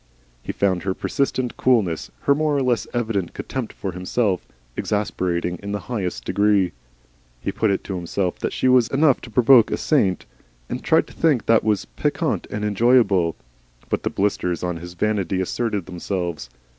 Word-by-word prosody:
He - - -4
found 95 -3 +1
her 95 -1 -2
persistent 130 -3 -1
coolness, 105 -11 +1
her 140 - +4
more 150 0 +1
or 135 - +1
less 120 -4 +1
evident 110 -7 -2
contempt 130 -4 -4
for 95 - -5
himself, 90 +2 -1 0.3
exasperating 90 -4 -1
in 100 0 -5
the 105 - -3
highest 90 - -3
degree. 100 -3 +2 0.7
He - - -3
put 110 - 0
it 100 - 0
to 95 - -4
himself 90 +1 -2
that - - -2
she - - 0
was 125 -2 +5
enough 140 0 +3
to 120 - -10
provoke 120 0 +6
a - - -1
saint, 100 - +1 0.4
and - - -4
tried - - +3
to - - -15
think 150 -8 +2
that 115 -1 +4
was 105 -3 +1
piquant - - -2
and 105 0 -3
enjoyable, 105 -5 +3 0.6
but - - 0
the - - -1
blisters 90 -4 -1
on 90 -1 -2
his 85 +1 -9
vanity 95 -2 0
asserted 105 0 -1
themselves. 85 -6 -4
100 Hz, 170 wpm, -22 LUFS, 90-120 Hz, 0.7 s, provoke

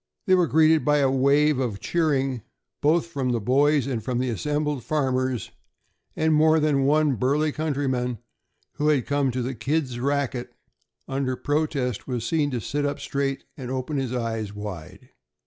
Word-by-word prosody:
They 185 - +3
were 180 -2 +4
greeted 160 0 +4
by 150 0 +3
a 135 -2 +3
wave 140 +2 +3
of 115 -6 -2
cheering 135 -7 0 0.4
both 155 +3 +3
from 135 -7 -2
the 120 - 0
boys 140 +5 +3
and 125 -5 -3
from 125 -2 -2
the 125 0 0
assembled 150 +2 -2
farmers, 130 -4 -1 0.6
and 160 0 +2
more 155 +1 +5
than 145 -3 +2
one 150 -2 +3
burly 145 +7 +1
countryman 135 -5 -1 0.6
who 150 - 0
had 145 -5 +2
come 145 -1 +1
to 125 0 -2
the 130 +2 -3
"kids' 135 0 -2
racket" 135 -2 -2 0.5
under 135 -1 -1
protest 145 -5 -1
was 120 -3 -3
seen 150 +1 +1
to 125 -3 -2
sit 145 +5 -2
up 145 0 -2
straight 140 -1 -2
and 130 -3 -7
open 130 +3 -3
his 130 -3 -2
eyes 115 -4 -3
wide. 105 -6 -8
135 Hz, 165 wpm, -25 LUFS, 125-150 Hz, 0.6 s, more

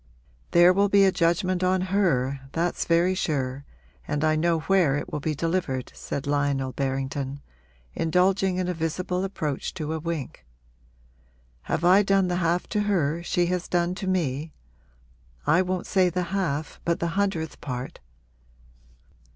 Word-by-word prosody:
'There 175 +1 +6
will 200 +2 +2
be 200 0 +5
a 190 - +4
judgment 180 +2 +1
on 185 +1 +2
her 165 -9 +1
that's 170 +2 -1
very 170 +2 +3
sure, 140 -6 -2 0.4
and 145 0 -1
I 155 0 +3
know 165 +1 +1
where 175 -5 +3
it 145 - -5
will - - -1
be 155 +1 -2
delivered,' 165 -5 -2
said 140 - -5
Lionel 140 -2 0
Berrington, 135 +1 -3 0.5
indulging 185 +3 +2
in 185 -1 -1
a 180 - 0
visible 180 +3 -2
approach 155 -8 -3
to 155 -3 -3
a 160 - -2
wink. 155 - -5 1.2
'Have 160 - -2
I 185 +3 +7
done 195 -2 +2
the 175 - 0
half 175 0 +1
to 210 - 0
her 165 -4 +1
she 175 0 +1
has 180 -1 -2
done 175 0 +1
to 190 0 -5
me? 160 -5 -1 0.9
I 180 - +4
won't 185 -1 -2
say 185 -2 +3
the 180 +1 -1
half 160 -6 -2
but 170 0 0
the 170 - -1
hundredth 175 -4 -2
part? 125 -2 -5
170 Hz, 155 wpm, -25 LUFS, 145-185 Hz, 1.2 s, I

